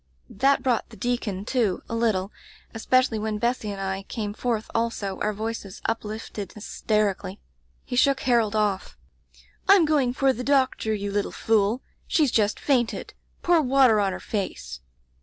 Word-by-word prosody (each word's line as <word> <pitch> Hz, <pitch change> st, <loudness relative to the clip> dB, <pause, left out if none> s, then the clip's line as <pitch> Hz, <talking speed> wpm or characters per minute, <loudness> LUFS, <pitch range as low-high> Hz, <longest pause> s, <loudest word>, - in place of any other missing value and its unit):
* -, -, -37 dB
"That 275 Hz, -1 st, +4 dB
brought 250 Hz, -4 st, 0 dB
the 225 Hz, -, -13 dB
deacon 235 Hz, -6 st, -2 dB
to, 225 Hz, -7 st, 0 dB
a -, -, -6 dB
little, 215 Hz, -4 st, 0 dB, 0.4 s
especially 240 Hz, 0 st, +2 dB
when 215 Hz, 0 st, -2 dB
Bessy 235 Hz, -1 st, -1 dB
and 200 Hz, -1 st, -5 dB
I 190 Hz, 0 st, -2 dB
came 205 Hz, +1 st, -5 dB
forth 225 Hz, -1 st, -2 dB
also, 230 Hz, -4 st, -2 dB
our 210 Hz, -, 0 dB
voices 215 Hz, -2 st, -5 dB
uplifted 215 Hz, -3 st, -4 dB
hysterically. 210 Hz, -2 st, -1 dB, 0.5 s
He 250 Hz, -, -4 dB
shook 275 Hz, +1 st, +3 dB
Harold 230 Hz, -4 st, +2 dB
off: 205 Hz, -3 st, -1 dB, 0.7 s
Tm 390 Hz, -4 st, +7 dB
going 285 Hz, -5 st, +2 dB
for 270 Hz, 0 st, +3 dB
the 250 Hz, -, -5 dB
doctor, 260 Hz, -5 st, +1 dB
you 205 Hz, -1 st, -2 dB
little 205 Hz, 0 st, -1 dB
fool. 220 Hz, +2 st, +1 dB, 0.2 s
She's 300 Hz, -6 st, +2 dB
just 210 Hz, -2 st, +1 dB
fainted. 245 Hz, -5 st, 0 dB, 0.3 s
Pour 345 Hz, -2 st, +4 dB
water 260 Hz, -5 st, +4 dB
on 200 Hz, -2 st, +1 dB
her -, -, -5 dB
face! 65 Hz, -, -4 dB
220 Hz, 160 wpm, -25 LUFS, 205-250 Hz, 0.7 s, Tm